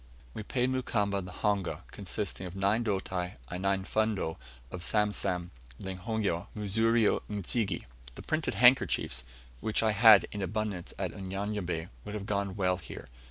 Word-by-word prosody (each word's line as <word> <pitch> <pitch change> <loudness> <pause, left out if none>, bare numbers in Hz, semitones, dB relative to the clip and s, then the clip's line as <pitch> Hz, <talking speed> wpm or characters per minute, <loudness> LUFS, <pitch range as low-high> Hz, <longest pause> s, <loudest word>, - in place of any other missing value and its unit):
We - - -5
paid 125 +4 0
Mukamba 105 -6 0
the 90 - -8
honga, 100 -1 -1
consisting 95 - -4
of 90 - -9
nine 100 +4 +2
doti 95 -4 -2 0.2
and 90 +1 -4
nine 95 0 +1
fundo 110 -7 0 0.3
of 90 - -6
samsam, 95 -3 0 0.3
lunghio, 95 -1 -2
muzurio 110 +2 +3
n'zige. 100 -1 -1 0.3
The - - -9
printed 155 -8 -1
handkerchiefs, 120 - +4 0.3
which 110 - +1
I 110 - +4
had 110 +1 +8
in 105 - -4
abundance 100 -1 -3
at 95 -3 -2
Unyanyembe, 95 -3 -3
would 105 - -6
have 100 -2 -4
gone 100 -2 -1
well 90 -2 +1
here. 80 - -9
100 Hz, 145 wpm, -30 LUFS, 90-110 Hz, 0.3 s, had